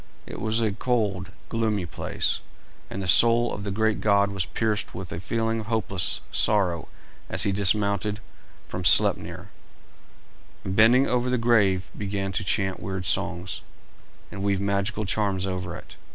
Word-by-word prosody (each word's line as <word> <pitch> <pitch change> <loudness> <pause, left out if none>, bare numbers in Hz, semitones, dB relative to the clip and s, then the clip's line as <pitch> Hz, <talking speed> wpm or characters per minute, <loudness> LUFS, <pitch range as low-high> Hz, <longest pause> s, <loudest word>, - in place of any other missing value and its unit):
It - - -8
was 110 +1 0
a 110 -2 +1
cold, 100 -5 -1 0.2
gloomy 110 -5 -1
place, 85 - -2 0.5
and 95 - -5
the - - -4
soul 115 +5 +6
of 100 - -6
the 100 - -3
great 110 +2 0
god 100 -1 +3
was 95 -3 -2
pierced 110 -2 -2
with 90 -1 -7
a 80 - -4
feeling 115 +4 -1
of 110 - -7
hopeless 105 -5 -1
sorrow 95 -6 +1 0.4
as - - +3
he 100 - +2
dismounted 100 +1 +1 0.5
from 90 - -5
Sleipner, - - +3 1.1
and 95 - -3
bending 120 +5 +6
over 125 -1 0
the 125 - +1
grave 105 -6 +2
began 100 -1 -3
to 95 - -2
chant 95 0 0
weird 95 -1 -5
songs, 85 +2 -2 0.7
and 100 - -7
weave 100 -1 0
magical 100 +2 -1
charms 100 -2 0
over 90 -2 -4
it. - - -12
100 Hz, 155 wpm, -25 LUFS, 95-110 Hz, 1.1 s, soul